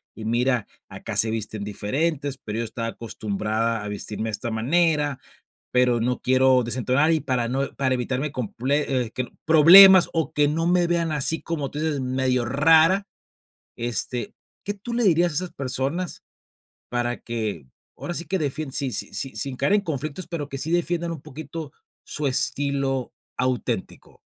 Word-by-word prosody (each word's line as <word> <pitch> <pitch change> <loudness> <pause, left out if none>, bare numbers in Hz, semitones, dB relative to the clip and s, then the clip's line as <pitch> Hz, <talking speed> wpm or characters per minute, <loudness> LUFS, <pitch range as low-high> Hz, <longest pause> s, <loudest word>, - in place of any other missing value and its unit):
y 110 - -8
mira, 120 0 +1 0.2
acá - - -7
se 110 - +3
visten 110 -1 -3
diferentes, 135 +7 -1
pero 110 -2 -5
yo 115 - -1
estaba 115 +1 -4
acostumbrada 110 0 -2
a - - -5
vestirme 105 +1 -4
de 110 - -2
esta 115 +3 -4
manera, 145 +4 +1 0.5
pero 125 -2 +3
no 125 +2 -1
quiero 130 0 +4
desentonar, 130 +6 +1
y 160 - +2
para 120 -3 -1
no 135 +2 -2
para 130 -2 +1
evitarme 130 +4 -2
comple 130 +3 -1
eh, - - -11
que, 130 -1 -3 0.2
problemas, 175 +4 +9
o, 160 -2 -1
que 145 -1 +3
no 165 +2 -1
me 175 0 +3
vean 170 -2 0
así 150 +3 -1
como 150 -5 -3
tú 145 - -6
dices 155 -3 -1
medio 130 -1 0
rara, 160 - +4 0.7
este, 120 - -2 0.3
¿qué 205 - -2
tú 220 +4 -8
le 240 - +1
dirías 175 -3 +3
a - - -7
esas 180 -1 -2
personas 135 +7 -3 0.7
para 120 0 -1
que 110 - -4 0.3
ahora 175 - -5
sí 170 - -3
que 190 +5 -1
defienden 145 -2 -3
sin 135 -2 -1
sin - - -2
sin 135 - -3
sin 135 -2 -3
caer 140 +9 +1
en 205 - +4
conflictos, 155 +1 -5
pero, 165 -4 -4
que 135 - -5
sí 160 +4 -3
defiendan 175 0 0
un 155 -4 -7
poquito 155 +1 -8 0.3
su 150 -1 -3
estilo 135 -1 -1 0.3
auténtico? 130 -1 -3
135 Hz, 170 wpm, -24 LUFS, 120-160 Hz, 0.7 s, problemas